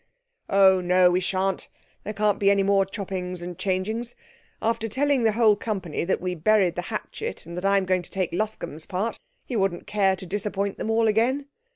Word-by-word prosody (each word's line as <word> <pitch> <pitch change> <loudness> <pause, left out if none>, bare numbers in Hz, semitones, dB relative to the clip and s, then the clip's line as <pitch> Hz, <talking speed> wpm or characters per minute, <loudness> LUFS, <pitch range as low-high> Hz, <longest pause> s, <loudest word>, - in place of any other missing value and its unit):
'Oh, 190 -1 +5
no, 180 0 +4
we 180 - +2
shan't! 190 0 -1 0.4
There 210 - -4
can't 210 -1 +1
be 200 - +4
any 200 -1 +3
more 195 -1 +3
choppings 185 -2 -4
and 175 0 -6
changings. 210 +7 -2 0.4
After 225 0 -1
telling 275 +3 +1
the 220 -2 +3
whole 220 -2 +5
company 195 -8 -3
that 190 - 0
we 180 0 -2
buried 185 +1 +3
the 180 - -3
hatchet 455 - -5
and 170 +1 -8
that 180 +2 -4
I 200 0 +4
am 195 - +1
going 185 0 +1
to - - -11
take 185 -3 -2
Luscombe's 185 -6 -4
part, 205 +5 -2 0.3
he 250 - -5
wouldn't 195 -4 0
care 195 -2 +2
to 185 - -9
disappoint 200 +1 -2
them - - -3
all 225 0 +3
again. 240 +6 +2
195 Hz, 200 wpm, -25 LUFS, 185-215 Hz, 0.4 s, Oh